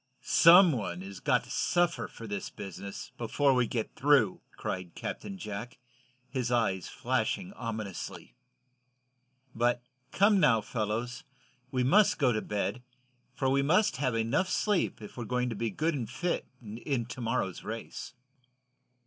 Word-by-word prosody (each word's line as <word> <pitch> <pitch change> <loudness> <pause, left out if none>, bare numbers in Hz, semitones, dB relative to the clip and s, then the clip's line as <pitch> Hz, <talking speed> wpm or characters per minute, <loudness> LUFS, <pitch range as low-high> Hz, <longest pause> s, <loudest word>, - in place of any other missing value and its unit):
"Some 175 +1 +8
one 100 -9 -3
has 95 -1 -8
got - - +2
to - - -12
suffer 175 -1 +1
for 115 - -10
this 100 -2 -4
business, 100 +3 -8
before 135 +4 +2
we 125 -2 +2
get 115 -1 -3
through!" 135 -9 +3 0.2
cried 90 -2 -4
Captain 195 -1 -5
Jack, 110 - -6 0.5
his 125 -2 -2
eyes 100 -7 +1
flashing 130 - -1
ominously. 110 - -6 1.2
"But 120 +1 +1 0.3
come, 200 +1 +4
now, 125 -9 +4
fellows, 110 +2 -3 0.5
we 130 -1 0
must 195 +12 +5
go 135 -7 +3
to 110 -2 0
bed, 105 +4 -2 0.5
for 135 - 0
we 135 +1 +3
must 185 +5 +3
have 130 -3 0
enough 115 +12 +1
sleep 205 - 0
if 105 - -10
we're 125 +1 -1
to 120 - -2
be 115 +2 -1
good 160 +10 0
and 120 -7 -3
fit 175 0 -2
in 120 +3 -3
to 120 +2 -8
morrow's 115 -6 -1
race." 115 +2 -6
120 Hz, 145 wpm, -30 LUFS, 110-145 Hz, 1.2 s, Some